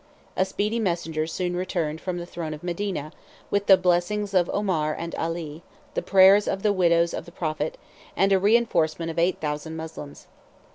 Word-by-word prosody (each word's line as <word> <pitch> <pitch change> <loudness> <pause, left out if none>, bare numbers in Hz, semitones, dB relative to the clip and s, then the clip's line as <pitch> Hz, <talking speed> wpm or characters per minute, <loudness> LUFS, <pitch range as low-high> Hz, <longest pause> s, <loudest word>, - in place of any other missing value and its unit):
A 190 - +2
speedy 210 +4 -1
messenger 170 -6 -1
soon 180 +1 -2
returned 170 -4 -2
from 180 -2 -3
the 175 - -5
throne 165 -3 -5
of 150 - -14
Medina, 175 -3 -3 0.4
with 200 0 0
the 190 - +8
blessings 185 +3 0
of 180 -2 +3
Omar 165 -7 0
and 170 0 -6
Ali, 165 -2 -4 0.3
the - - -1
prayers 195 +2 +6
of 195 - -2
the 210 -1 +3
widows 170 -2 +3
of - - -5
the 170 - -12
prophet, 155 -2 -3 0.4
and 195 0 +3
a 190 - +4
reenforcement 185 -7 +2
of 165 - -3
eight 175 +2 +1
thousand 150 +1 -4
Moslems. 160 -3 -8
175 Hz, 180 wpm, -25 LUFS, 160-195 Hz, 0.4 s, the